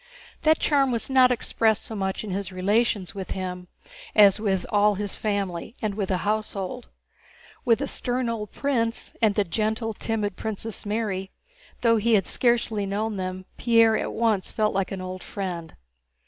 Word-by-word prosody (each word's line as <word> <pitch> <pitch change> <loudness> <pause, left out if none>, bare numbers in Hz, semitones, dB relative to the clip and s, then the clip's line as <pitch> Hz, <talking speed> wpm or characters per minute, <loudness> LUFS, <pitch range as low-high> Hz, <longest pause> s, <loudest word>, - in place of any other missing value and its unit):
That 315 0 +4
charm 275 -3 +2
was 235 +2 -2
not 260 -1 +6
expressed 225 -2 +1
so - - -6
much 190 -1 -2
in 210 - -5
his 195 -1 -2
relations 200 +1 +1
with 195 -2 -6
him 180 -1 -5 0.5
as 205 -1 +7
with 195 -4 0
all 210 0 +4
his 205 0 -3
family 200 -1 -2
and 215 -2 -1
with 200 -2 -3
the 180 -3 -1
household. 215 +2 -2 0.8
With 230 -3 +5
the 280 - -3
stern 250 -1 -1
old 220 -3 -3
prince 235 -5 -1
and 215 -3 +3
the 205 - +3
gentle, 220 +5 -1
timid 210 -2 -2
Princess 220 +1 -4
Mary, 205 -3 -2 0.5
though 230 -1 +4
he 225 +1 +3
had 195 - +2
scarcely 230 -4 +1
known 210 +2 -2
them, 185 0 -4
Pierre 230 -2 +5
at - - -1
once 220 -4 +1
felt 215 -1 +1
like 195 -1 -1
an 195 -1 -4
old 185 0 -6
friend. 175 -5 -5
210 Hz, 170 wpm, -25 LUFS, 190-230 Hz, 0.8 s, as